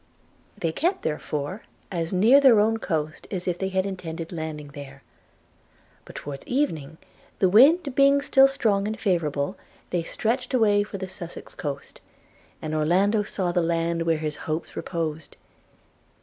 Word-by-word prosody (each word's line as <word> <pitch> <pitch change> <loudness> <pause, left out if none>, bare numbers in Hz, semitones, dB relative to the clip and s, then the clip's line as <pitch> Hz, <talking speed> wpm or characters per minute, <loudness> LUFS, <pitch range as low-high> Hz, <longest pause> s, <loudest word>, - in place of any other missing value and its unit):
They 165 -5 -1
kept, 350 - -1
therefore, 150 +5 -3 0.3
as 170 -2 -2
near 225 +9 +6
their 255 -6 +7
own 225 +2 +2
coast 155 -6 -3
as 185 -3 -4
if 175 -1 -1
they 190 - -1
had 190 0 0
intended 170 -4 -5
landing 155 -3 -5
there; 140 -1 -11 1.0
but - - -13
towards 140 -1 -7
evening, 160 - -1 0.4
the 190 - +3
wind 275 - +5
being 275 +1 +5
still 270 -1 +6
strong 210 -7 +1
and 220 +1 -4
favourable, 165 -3 0 0.3
they 175 - +1
stretched 245 +9 -2
away 205 -4 +4
for 205 -1 -5
the 190 -1 -5
Sussex 175 -2 -9
coast, 140 -2 -6 0.6
and 155 0 -3
Orlando 185 +8 +2
saw 190 -3 -2
the 175 0 +1
land 165 0 0
where 165 -1 +1
all - - -8
his 150 -1 -2
hopes 155 +1 -4
reposed! 160 -3 -4
180 Hz, 155 wpm, -25 LUFS, 160-215 Hz, 1.0 s, their